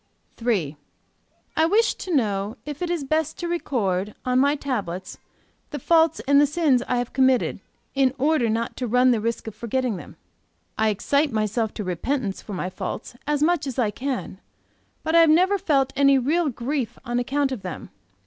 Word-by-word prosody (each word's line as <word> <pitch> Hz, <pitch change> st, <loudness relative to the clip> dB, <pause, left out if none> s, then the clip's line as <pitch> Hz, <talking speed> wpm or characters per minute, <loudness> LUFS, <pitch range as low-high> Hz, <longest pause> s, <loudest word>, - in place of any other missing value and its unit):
"III. 175 Hz, -, 0 dB, 0.8 s
I 320 Hz, -, +3 dB
wish 440 Hz, +6 st, +3 dB
to 370 Hz, -, -7 dB
know 210 Hz, -2 st, 0 dB
if 295 Hz, +1 st, -7 dB
it 350 Hz, -, -1 dB
is 345 Hz, -4 st, -1 dB
best 310 Hz, +2 st, -1 dB
to 345 Hz, -, -4 dB
record, 210 Hz, -, -1 dB
on 250 Hz, 0 st, +2 dB
my 285 Hz, +2 st, +3 dB
tablets, 200 Hz, -, -4 dB, 0.5 s
the 295 Hz, -, -5 dB
faults 325 Hz, +1 st, +3 dB
and 285 Hz, +1 st, +4 dB
the 290 Hz, -, +4 dB
sins 295 Hz, -4 st, +2 dB
I 250 Hz, -, 0 dB
have 245 Hz, -1 st, -3 dB
committed, 260 Hz, -1 st, +2 dB, 0.3 s
in 270 Hz, -2 st, +3 dB
order 275 Hz, -3 st, +2 dB
not 230 Hz, +1 st, -1 dB
to 250 Hz, -, -2 dB
run 250 Hz, +2 st, +4 dB
the 230 Hz, -3 st, +1 dB
risk 230 Hz, +1 st, -2 dB
of 220 Hz, -, -6 dB
forgetting 240 Hz, -1 st, -2 dB
them. -, -, -11 dB, 0.6 s
I 220 Hz, 0 st, +2 dB
excite 280 Hz, +9 st, +1 dB
in 225 Hz, -, -6 dB
myself 215 Hz, +1 st, 0 dB
to 210 Hz, -, -4 dB
repentance 200 Hz, -, -2 dB
for 210 Hz, -, -8 dB
my 185 Hz, 0 st, -3 dB
faults 245 Hz, -, -6 dB
as 295 Hz, 0 st, +1 dB
much 340 Hz, -2 st, +2 dB
as 265 Hz, -, -5 dB
I 225 Hz, -5 st, +1 dB
can; 265 Hz, +4 st, -4 dB, 0.6 s
but 320 Hz, -, -1 dB
I 335 Hz, -, +7 dB
have 325 Hz, -, +5 dB
never 370 Hz, +6 st, +4 dB
felt 275 Hz, -7 st, +1 dB
any 275 Hz, -1 st, +5 dB
real 300 Hz, +5 st, +1 dB
grief 250 Hz, 0 st, -3 dB
on 240 Hz, +1 st, -1 dB
account 275 Hz, +2 st, 0 dB
of 255 Hz, -6 st, -4 dB
them. 180 Hz, -4 st, -7 dB
260 Hz, 190 wpm, -24 LUFS, 220-295 Hz, 0.8 s, I